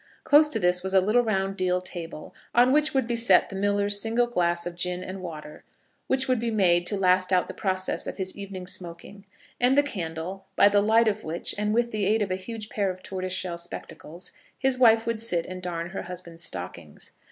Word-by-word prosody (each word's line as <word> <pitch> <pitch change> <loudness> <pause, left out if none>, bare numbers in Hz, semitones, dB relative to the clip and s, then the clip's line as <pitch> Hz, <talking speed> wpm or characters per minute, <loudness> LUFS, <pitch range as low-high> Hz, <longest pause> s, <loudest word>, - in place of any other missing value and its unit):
Close 300 +1 +5
to 225 - -1
this 180 -1 +2
was 190 +1 -2
a - - +8
little 215 +6 +3
round 195 -4 -1
deal 180 -1 +1
table, 170 -4 -8 0.2
on 245 +2 +5
which 300 +2 +3
would 265 -3 +1
be 235 0 -1
set 230 -5 +4
the 195 - -8
miller's 205 +1 +1
single 230 +2 +2
glass 175 -7 0
of 175 - -4
gin 180 +1 -2
and 185 +1 -7
water, 155 -4 -8 0.5
which 265 0 +1
would 255 -2 +2
be 235 +1 -1
made 175 -5 +2
to 205 - 0
last 185 0 +3
out 180 -1 +3
the - - -8
process 185 -2 -2
of - - -5
his 190 -1 -3
evening 195 -2 -7
smoking, 180 +2 -5 0.3
and 250 +3 +3
the 285 - +6
candle, 185 - -5
by - - +6
the 205 0 +4
light 225 +2 +4
of 215 0 0
which, 160 +2 -2
and 210 +1 -1
with 235 +2 +1
the 210 -3 -1
aid 215 +1 +2
of 195 - -4
a - - +1
huge 215 +3 -7
pair 200 -2 -1
of 185 0 -7
tortoise 185 -1 -5
shell 180 -2 -3
spectacles, 170 0 -9 0.3
his 265 -1 +1
wife 230 -3 +5
would 230 -1 -2
sit 180 -7 -1
and 185 0 -7
darn 170 -1 -4
her 195 - -4
husband's 175 -2 -8
stockings. 90 - -7
190 Hz, 220 wpm, -26 LUFS, 180-225 Hz, 0.5 s, a